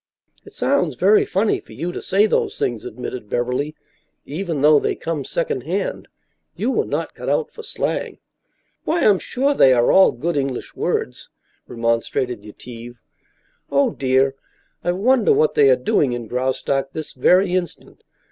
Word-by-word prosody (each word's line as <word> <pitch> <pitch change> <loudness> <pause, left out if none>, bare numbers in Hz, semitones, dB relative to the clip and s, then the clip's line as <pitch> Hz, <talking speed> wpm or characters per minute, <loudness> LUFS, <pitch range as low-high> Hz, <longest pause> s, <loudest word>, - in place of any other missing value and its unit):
"It - - -15
sounds - - 0
very 420 -1 +4
funny 210 - 0
for - - -16
you 175 +2 -4
to - - -6
say 200 +3 +2
those 215 - 0
things," 120 -3 -2
admitted 120 -1 -7
Beverly, 125 +5 -2 0.5
"even 160 0 -3
though 150 0 +6
they - - -1
come 165 -4 -4
secondhand. 165 +11 -3 0.5
You 240 +5 -1
were 435 - 0
not - - -3
cut - - -6
out 475 - 0
for 450 - -10
slang." 445 - -3 0.7
"Why, 335 +2 0
I'm 200 -3 +4
sure 275 +3 0
they 135 - +5
are 120 -1 +3
all 190 - +6
good 165 +7 -3
English 135 -3 -3
words," - - -3 0.4
remonstrated 115 0 -1
Yetive. 120 +3 -10 0.8
"Oh, 140 0 +3
dear, 135 0 +1 0.5
I 175 - +1
wonder 245 - +3
what 460 +2 +2
they 435 -1 +5
are - - +6
doing 180 - +1
in 120 -1 -4
Graustark 130 +2 -1
this 155 -1 -6
very 180 +8 +3
instant. 185 -2 -4
150 Hz, 155 wpm, -21 LUFS, 125-200 Hz, 0.8 s, though